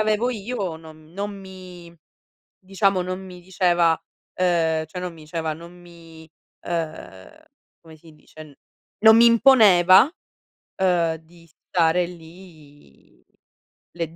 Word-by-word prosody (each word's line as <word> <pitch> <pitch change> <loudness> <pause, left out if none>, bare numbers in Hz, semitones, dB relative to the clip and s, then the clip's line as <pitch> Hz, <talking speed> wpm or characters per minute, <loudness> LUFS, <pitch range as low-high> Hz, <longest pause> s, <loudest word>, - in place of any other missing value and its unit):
avevo 215 +3 0
io 205 -6 -5
non 160 -1 -14
m 155 +1 -20
non 200 +2 -5
mi 180 -3 -13 0.6
diciamo, 195 0 0
non 185 +1 -5
mi 180 -1 -12
diceva 175 -2 +1 0.5
uhm, 165 -3 +1
cioè, 180 - -9
non 180 -1 -5
mi 160 - -15
diceva 160 0 -4
non 170 +3 -12
mi 165 -2 -16 0.3
uhm, 160 - -7 0.4
come 160 -1 -16
si 160 +1 -18
dice, 155 +1 -15
n 145 - -17 0.4
non 220 0 +6
mi 235 +1 +6
imponeva, 220 - +5 0.7
uhm, 170 -3 +1
di 165 +1 -21
stare 165 +2 -1
lì 160 - -17 0.7
le 165 -1 -6
175 Hz, 125 wpm, -22 LUFS, 160-190 Hz, 0.7 s, non